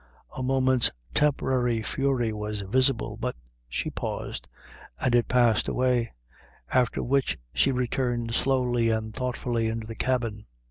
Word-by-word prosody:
A - - -4
moment's 130 -1 +3 0.2
temporary 125 -5 +2
fury 130 -3 0
was 105 0 -4
visible, 130 - +1
but - - -2 0.3
she - - -2
paused, - - -4 0.5
and 120 - +1
it 120 -1 +4
passed 120 -3 +3
away; 125 -2 +1 0.6
after 125 -2 +2
which 135 +2 +1 0.2
she 135 - +3
returned 120 -2 -1
slowly 125 -3 +2
and 110 -1 -1
thoughtfully 125 -2 -1
into 110 0 -3
the 115 - -6
cabin. 115 -4 -1
120 Hz, 130 wpm, -27 LUFS, 115-130 Hz, 0.6 s, it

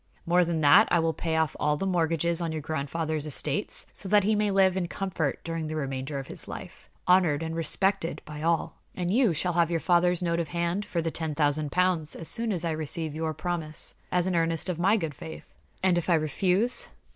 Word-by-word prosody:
More 175 +1 +4
than 165 -2 -1
that, 150 +9 +7
I - - +3
will 165 -1 +1
pay 160 0 -2
off 160 -1 +1
all 150 0 +1
the 195 - -3
mortgages 170 -2 +1
on 165 -1 -2
your 160 - -3
grandfather's 155 +1 -3
estates, 150 +5 0
so 195 - -4
that 205 0 +5
he 215 +3 +2
may 210 0 +1
live 190 -2 +3
in 185 -2 -1
comfort 170 -6 -2
during 165 -1 -3
the 155 - -4
remainder 135 -1 -3
of 135 - -5
his - - -6
life, - - -9 0.2
honored 175 -5 +4
and 160 0 -4
respected 170 +2 0
by 150 -1 -8
all. 165 0 0 0.2
And 180 -1 -2
you 240 -4 +4
shall 175 +3 -1
have 170 -1 +2
your 170 -1 0
father's 175 +1 +2
note 170 -1 0
of 170 - -2
hand 170 +6 -2
for 170 -2 -2
the 165 - -1
ten 160 -2 -3
thousand 145 -1 0
pounds 180 -4 +1
as 165 - -5
soon 230 -1 0
as 175 -3 0
I 165 - 0
receive 155 0 -1
your 160 0 -3
promise, 165 -3 -1 0.2
as 180 -1 +2
an 185 -1 0
earnest 165 +1 0
of 175 -2 -3
my 200 +5 +3
good 160 -7 -3
faith." 160 +3 -10 0.3
"And 180 -2 +3
if 175 - -5
I 170 - +5
refuse?" 180 - +1
165 Hz, 225 wpm, -27 LUFS, 155-180 Hz, 0.3 s, that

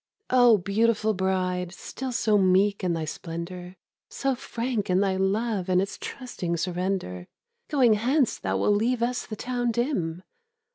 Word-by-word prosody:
O, 245 -3 +6
beautiful 215 +3 +1
bride, 185 -2 -1
still 255 +8 -6
so 220 -3 +2
meek 195 +2 +3
in 180 -2 +1
thy 165 -1 -2
splendour, 175 +3 -6 0.3
So 270 -1 -1
frank 240 -4 -3
in 180 0 +3
thy 195 -1 +1
love 195 0 0
and 180 0 +4
its 195 +1 -3
trusting 180 -10 -4
surrender, 175 - -2 0.4
Going 260 -7 +4
hence 250 +5 +1
thou - - -1
wilt 205 - +3
leave 235 +2 +1
us 245 +1 -1
the 215 - -5
town 245 +2 -2
dim! 205 - -1
200 Hz, 150 wpm, -26 LUFS, 180-240 Hz, 0.4 s, O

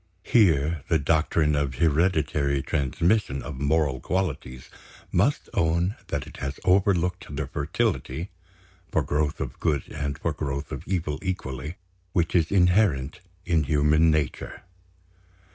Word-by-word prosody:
Here 80 - +3
the 80 - +4
doctrine 75 +1 +2
of 70 -3 -1
hereditary 75 -3 +1
transmission 75 - 0
of 65 0 -7
moral 70 -2 +1
qualities 70 -9 -3 0.4
must - - +1
own 85 +5 +1
that - - -3
it - - -12
has 70 +1 -4
overlooked 90 -1 +2
the 70 0 -3
fertility 70 +3 -2 0.6
(for - - +2
growth 75 0 -1
of - - -5
good 70 -4 0
and 70 -1 -3
for - - -2
growth 70 0 -4
of - - -6
evil 85 -5 -1
equally) 75 -5 -4 0.4
which 85 -2 +1
is 85 -3 +3
inherent 90 -6 +3 0.3
in 80 -4 +2
human 75 +3 +3
nature. 75 -2 -2
75 Hz, 125 wpm, -25 LUFS, 70-85 Hz, 0.6 s, the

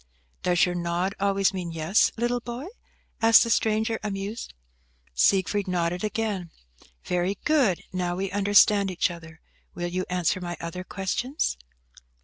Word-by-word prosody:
"Does 175 -1 +3
your 180 - -2
nod 175 +2 -1
always 195 -1 +2
mean 180 -3 -4
yes, 165 +5 +2
little 240 +1 0
boy?" 240 +3 -6 0.6
asked 225 0 +7
the 230 - -2
stranger, 220 0 +1
amused. 205 - -5 0.6
Siegfried 195 - +2
nodded 180 0 -1
again. 210 -5 -2 0.6
"Very 180 +2 -1
good. 270 - +2
Now 180 -1 -1
we 195 +1 -3
understand 205 0 +4
each 180 0 0
other. 160 -2 -12 0.3
Will 175 0 -3
you 185 +1 -3
answer 180 0 0
my 175 -1 -5
other 170 +2 -5
questions?" 220 - -2
190 Hz, 135 wpm, -26 LUFS, 175-215 Hz, 0.6 s, asked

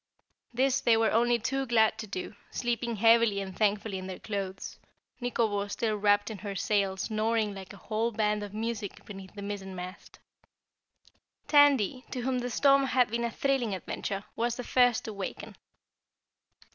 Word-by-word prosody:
This 265 +2 +1
they 230 -3 +4
were 225 0 +2
only 240 +1 +3
too 270 +4 -2
glad 220 -2 +3
to 220 - -5
do, 190 +1 -5 0.2
sleeping 235 -1 -2
heavily 225 -1 +4
and 190 -2 -6
thankfully 205 -1 0
in 185 - -7
their 185 - -6
clothes, 195 -2 -5 0.4
Nikobo 220 -4 0
still 215 +1 -1
wrapped 205 +1 +2
in 210 - -7
her 200 0 -5
sail 195 -1 0
snoring 215 +1 0
like 190 -2 -9
a 200 - -11
whole 225 +2 -1
band 210 -1 0
of 205 -1 -6
music 220 -1 -4
beneath 195 -1 -10
the 200 - -7
mizzenmast. 190 -2 -7 1.3
Tandy, 275 -5 +4
to 250 - -4
whom 255 +1 0
the 245 0 -3
storm 275 +3 +4
had 250 -3 +2
been 235 +1 -1
a 235 - 0
thrilling 250 -5 0
adventure, 195 +2 -4
was 235 +1 0
the 250 - -5
first 245 -1 +3
to 220 - -5
waken. 195 -2 -6
220 Hz, 165 wpm, -29 LUFS, 200-240 Hz, 1.3 s, they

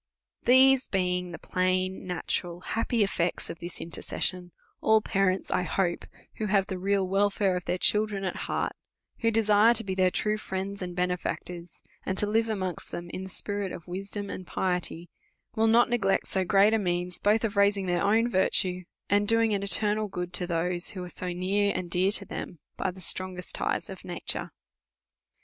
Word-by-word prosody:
Tiiese 260 +1 +6
being 180 -1 0
the 170 - -6
plain, 185 +1 -1
natural, 175 0 -3
happy 225 +2 0
effects 180 -3 -1
of 165 - -10
this 175 0 -6
intercession, 175 +2 -3 0.3
all 220 0 +5
parents, 195 -2 0
I - - +2
hope, 180 -1 -1 0.3
who 215 - -2
have 195 -1 +3
the 190 -2 -5
real 195 0 +1
welfare 195 0 +2
of 180 - -4
tlieir 180 - -1
children 210 -2 +2
at 185 - -2
heart, - - -1 0.5
who 230 - +2
desire 220 +1 +4
to 225 - 0
be 190 -2 -3
their 185 -1 +3
true 210 +3 -1
friends 195 0 -4
and 180 -1 -5
benefactors, 180 -1 -3 0.2
and 190 - -2
to 210 - +1
live 225 +2 +1
amongst 185 -6 -3
them 175 0 -6
in 185 - -5
the 190 - -7
spirit 200 0 -3
of 170 - -9
wisdom 195 +3 -5
and 185 - -7
piety, 180 -2 -2 0.5
will 225 +1 +3
not 235 +2 +5
neg 240 -3 -1
lect 195 0 +2
so 190 - 0
great 200 +4 +4
a 225 - +3
means, 180 -2 0
both 215 +2 +2
of 220 -2 -1
raising 200 -1 +3
their 175 -1 0
own 225 +3 +3
virtue^ 185 -3 +2 0.2
and 205 +1 +2
doing 225 0 +3
an 200 - 0
eternal 210 +1 0
good 180 -2 -5
to 180 0 0
those 175 +1 +1
who 185 -2 -5
are 180 - -7
so 180 0 -1
near 195 +3 +1
and 180 -2 -4
dear 185 +2 +3
to 200 -1 +2
them 180 - -6 0.2
by 190 - -1
the 185 +1 -9
strongest 185 0 -3
ties - - -1
of - - -9
nature. - - -4
190 Hz, 190 wpm, -28 LUFS, 180-205 Hz, 0.5 s, Tiiese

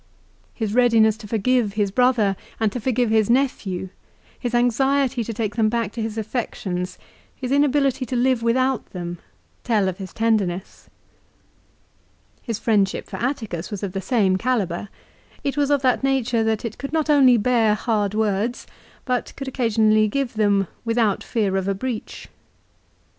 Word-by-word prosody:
His 220 -3 -2
readiness 230 -3 +4
to 220 -2 -10
forgive 225 0 +1
his 205 -2 0
brother 240 -4 +3 0.2
and 220 -2 +1
to 245 - -4
forgive 245 -1 0
his 220 -1 +3
nephew, 220 -8 0 0.5
his 245 -1 -2
anxiety 260 +1 +2
to 230 - -5
take 215 -2 -3
them 220 -2 +2
back 230 -2 -1
to 230 - -5
his 220 0 -4
affections, 200 -5 -3 0.4
his 255 -1 -5
inability 275 -2 +2
to 255 - -3
live 250 0 +2
without 255 +2 +1
them, 175 -2 -5 0.4
tell 215 -5 +2
of 190 +1 -3
his 190 -2 -7
tenderness. 210 -5 -1 1.5
His 230 -4 -4
friendship 205 -4 +1
for - - -7
Atticus 220 - -3
was 205 -2 -6
of 195 - -2
the 195 +1 -4
same 195 -5 +2
calibre. 205 -5 -1 0.5
It 280 - -1
was 290 -1 +1
of 285 -2 +2
that 255 0 +2
nature 250 -4 +1
that 220 +1 0
it 225 - -6
could 280 +2 -6
not 315 -1 +1
only 270 -5 +6
bear 225 -2 +3
hard 210 -2 -1
words 220 +2 -1 0.4
but 250 -2 -1
could 275 - -6
occasionally 220 -4 +2
give 270 +3 -2
them 205 -3 +2 0.2
without 230 -3 +1
fear 205 -4 -1
of 190 0 -2
a 195 - 0
breach. 235 +2 -5
225 Hz, 160 wpm, -22 LUFS, 205-250 Hz, 1.5 s, only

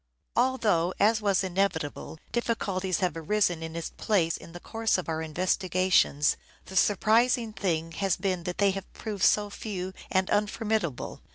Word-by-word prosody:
Although, 215 -9 +2
as 220 +2 +4
was 200 -2 +2
inevitable, 180 -5 -2
difficulties 195 -6 -1
have 180 -4 0
arisen 175 0 +1
its 165 0 -5
place 175 -6 +1
in - - -11
the 175 - -9
course 225 +3 0
of 185 - -4
our 160 -1 -2
investigations, 180 -2 +2 0.3
the 190 - -10
surprising 225 +4 +3
thing 165 -5 -1
has 190 +2 0
been 185 -2 -2
that 180 -1 -3
they 200 -1 +4
have 195 0 -7
proved 210 -4 -5
so 205 -1 +4
few 190 -3 -5 0.2
and 190 0 +1
unformidable. 210 - -1
190 Hz, 150 wpm, -28 LUFS, 170-210 Hz, 0.3 s, as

